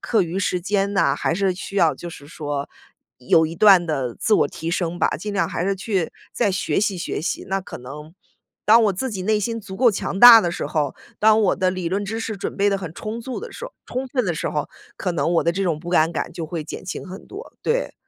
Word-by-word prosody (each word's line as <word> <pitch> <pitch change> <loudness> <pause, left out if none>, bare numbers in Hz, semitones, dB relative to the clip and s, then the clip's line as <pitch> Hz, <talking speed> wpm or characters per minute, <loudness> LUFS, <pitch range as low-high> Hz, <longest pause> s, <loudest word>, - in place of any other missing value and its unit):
课 225 -4 +2
余 175 +2 -3
时 180 -2 0
间 200 +2 0
呐， 195 - +2
还 165 - 0
是 195 0 +1
需 195 +1 -7
要 165 -4 +4
就 175 - -8
是 145 -3 -12
说 145 -3 -4 0.5
有 145 +6 +3
一 165 +1 -7
段 195 -3 +6
的 135 -6 -2
自 215 - +1
我 - - +3
提 165 +1 -5
升 175 0 -2
吧。 - - +4
尽 210 +3 -5
量 200 - 0
还 175 - -2
是 195 - +1
去 190 -3 -2 0.2
再 200 - +1
学 185 - 0
习 200 -3 0
学 170 - -3
习。 180 - -3
那 195 0 0
可 - - -9
能 150 +6 -10 0.5
当 225 +2 +7
我 205 - +3
自 255 +7 -3
己 190 -3 -4
内 215 +1 +1
心 230 +2 -2
足 190 -2 -9
够 245 -3 +5
强 195 -1 -3
大 240 -2 +11
的 175 - -1
时 - - -4
候， 145 -3 -1 0.2
当 220 +1 +5
我 200 - +2
的 185 -1 +1
理 185 -2 -3
论 200 +3 -1
知 225 +3 -4
识 220 -2 -4
准 - - -5
备 205 +1 +3
得 200 - +1
很 175 -4 -7
充 220 +5 -5
足 255 +7 -5
的 470 - -8
时 - - -8
候 - - -9
充 260 +2 -3
分 250 -3 0
的 175 - 0
时 - - -2
候， 150 - -2 0.3
可 180 - -2
能 165 +1 0
我 - - +2
的 170 - +3
这 195 +2 -2
种 165 -5 -1
不 175 0 -7
安 165 -1 +3
感 170 - -3
就 170 -1 -5
会 160 -1 -4
减 - - -8
轻 185 - -6
很 190 +2 -10
多， 420 +5 -10
对。 - - -1
190 Hz, 280 characters per minute, -22 LUFS, 170-215 Hz, 0.5 s, 大